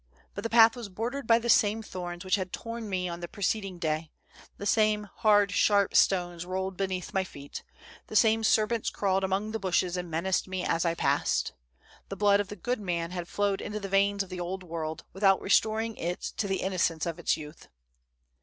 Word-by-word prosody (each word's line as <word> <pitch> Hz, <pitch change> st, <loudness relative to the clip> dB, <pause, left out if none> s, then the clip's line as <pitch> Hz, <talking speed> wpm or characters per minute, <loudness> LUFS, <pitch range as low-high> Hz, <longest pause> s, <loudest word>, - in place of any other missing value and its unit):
But 200 Hz, -, -6 dB
the 230 Hz, -, -2 dB
path 225 Hz, 0 st, +7 dB
was 235 Hz, -4 st, -7 dB
bordered 235 Hz, +7 st, -4 dB
by 230 Hz, -, +6 dB
the 235 Hz, 0 st, -4 dB
same 220 Hz, -1 st, +3 dB
thorns 175 Hz, -2 st, -6 dB
which 185 Hz, -, -2 dB
had 185 Hz, -2 st, +1 dB
torn 230 Hz, -2 st, -6 dB
me 185 Hz, -2 st, -1 dB
on 170 Hz, -1 st, -5 dB
the 175 Hz, -, -5 dB
preceding 195 Hz, 0 st, -2 dB
day; 155 Hz, -1 st, -2 dB, 0.5 s
the 200 Hz, -, -6 dB
same 215 Hz, -1 st, +2 dB
hard, 205 Hz, -3 st, +4 dB
sharp 200 Hz, 0 st, +3 dB
stones 175 Hz, -3 st, +2 dB
rolled 190 Hz, +1 st, -3 dB
beneath 185 Hz, -1 st, -3 dB
my 190 Hz, -, +1 dB
feet; 140 Hz, -5 st, -9 dB, 0.4 s
the -, -, -8 dB
same 225 Hz, 0 st, +4 dB
serpents 220 Hz, +1 st, +2 dB
crawled 195 Hz, -1 st, 0 dB
among 195 Hz, +3 st, -1 dB
the 225 Hz, -, -3 dB
bushes 185 Hz, -2 st, 0 dB
and 180 Hz, -1 st, -4 dB
menaced 170 Hz, +5 st, 0 dB
me 185 Hz, -1 st, -3 dB
as 165 Hz, +1 st, 0 dB
I 170 Hz, 0 st, +1 dB
passed. -, -, 0 dB, 0.6 s
The 195 Hz, -, -5 dB
blood 200 Hz, 0 st, +4 dB
of 205 Hz, -, -1 dB
the 205 Hz, -, -7 dB
good 245 Hz, +3 st, -2 dB
man 170 Hz, -4 st, -2 dB
had 175 Hz, -1 st, -5 dB
flowed 200 Hz, 0 st, 0 dB
into 210 Hz, +1 st, -4 dB
the 200 Hz, -1 st, -6 dB
veins 200 Hz, +1 st, +2 dB
of 190 Hz, -, -14 dB
the 185 Hz, -1 st, -6 dB
old 185 Hz, +2 st, -4 dB
world, 160 Hz, -1 st, -5 dB
without 195 Hz, 0 st, +4 dB
restoring 220 Hz, +3 st, +2 dB
to -, -, -12 dB
it 175 Hz, +2 st, -3 dB
the 195 Hz, -2 st, -1 dB
innocence 175 Hz, -4 st, 0 dB
of 170 Hz, 0 st, -4 dB
its 170 Hz, -, +1 dB
youth. 150 Hz, +1 st, -11 dB
195 Hz, 205 wpm, -28 LUFS, 175-210 Hz, 0.6 s, path